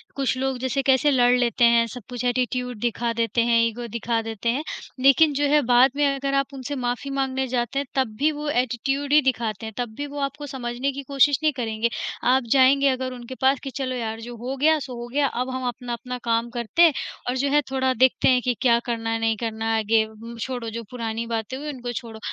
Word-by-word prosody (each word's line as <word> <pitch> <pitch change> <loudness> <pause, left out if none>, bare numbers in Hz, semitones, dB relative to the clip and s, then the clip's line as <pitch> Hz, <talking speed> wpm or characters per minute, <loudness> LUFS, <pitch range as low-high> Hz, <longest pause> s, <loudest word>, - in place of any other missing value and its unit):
कुछ 270 -2 0
लोग 265 -1 -1
जैसे 260 +2 -1
कैसे 270 +2 +4
लड़ 245 -2 +4
लेते 240 0 +3
हैं, 235 0 +5
सब 250 +2 -8
कुछ 245 0 -5
एटीट्यूड 250 -1 -1
दिखा 235 0 -1
देते 230 0 0
हैं, 230 -1 +4
ईगो 235 +1 -4
दिखा 230 0 -1
देते 225 +1 -3
हैं, 275 +6 0 0.4
लेकिन 280 +3 +5
जो 290 +1 +1
है 295 0 +4
बाद 250 +2 +5
में 290 0 +2
अगर 275 0 -1
आप 275 0 0
उनसे 275 +2 -5
माफ़ी 245 +2 -3
माँगने 265 -1 -1
जाते 250 +2 -1
हैं 280 - -2
तब 245 -5 0
भी 305 +2 +3
वो 300 0 -5
एटीट्यूड 270 +3 -1
ही 300 - +7
दिखाते 230 -5 -1
हैं, 220 - -7
तब 240 -3 -3
भी 290 0 -3
वो 285 0 -7
आपको 280 +1 -3
समझने 255 0 -3
की 280 +1 -7
कोशिश 280 0 +3
नहीं 305 -2 +3
करेंगे। 225 -1 -1 0.4
आप 265 -1 +2
जाएँगे 275 +1 +5
अगर 255 0 -2
उनके 245 +1 -8
पास 265 0 +3
कि 270 - -4
चलो 255 -1 -2
यार 225 -2 -4
जो 240 +1 -8
हो 255 +4 -4
गया 310 +3 +4
सो 260 -3 -7
हो 240 - -6
गया 285 -1 +3
अब 255 +1 -3
हम 255 -1 -3
अपना-अपना 245 +1 -5
काम 230 0 0
करते 240 - -1
हैं 330 -4 +7 0.4
और 255 - -1
जो 280 +2 +1
है 295 0 +4
थोड़ा 260 -1 +1
देखते 255 +2 +3
हैं 250 -1 +4
कि 250 0 0
क्या 235 -3 +4
करना 225 -2 -2
है, 225 0 0
नहीं 225 -1 +1
करना 225 -1 -4
है, - - +2
आगे 220 +1 +2 0.3
छोड़ो 245 -2 -4
जो 230 +1 -6
पुरानी 230 -1 -3
बातें 230 +2 -3
हुई 295 - -7
उनको 245 -2 -6
छोड़ो। 225 -1 -7
250 Hz, 230 wpm, -24 LUFS, 235-275 Hz, 0.4 s, ही